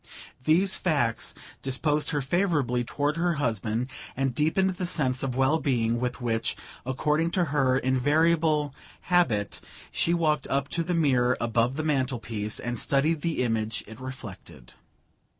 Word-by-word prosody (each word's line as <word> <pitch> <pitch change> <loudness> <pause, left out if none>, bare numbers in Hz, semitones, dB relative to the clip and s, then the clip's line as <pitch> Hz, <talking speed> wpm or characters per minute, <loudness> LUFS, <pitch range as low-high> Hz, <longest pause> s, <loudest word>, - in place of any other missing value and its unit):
These 185 +5 +4
facts 140 -10 0 0.3
disposed 145 +3 +1
her 145 -3 -1
favourably 145 -7 +1
toward 145 +5 -1
her 170 0 +1
husband, 115 -2 -1 0.3
and 135 -1 0
deepened 160 +8 +2
the 180 -1 -4
sense 130 -7 0
of 130 -3 -2
well 135 +5 +3
being 120 -5 +1
with 125 +1 -2
which 115 -2 -1 0.3
according 150 +5 +1
to 180 - +3
her 130 -3 +3
invariable 150 +3 +2 0.4
habit 110 -13 +2 0.3
she 170 - +1
walked 155 -4 +1
up 140 +1 -1
to 170 - -1
the 175 +1 -1
mirror 130 -6 +3
above 115 +2 +1
the 155 - -2
mantelpiece 120 -7 -1
and 120 -1 -3
studied 145 +6 +1
the 165 -6 0
image 110 -2 -1
it 110 +2 -11
reflected. 100 - -9
135 Hz, 145 wpm, -27 LUFS, 120-155 Hz, 0.4 s, These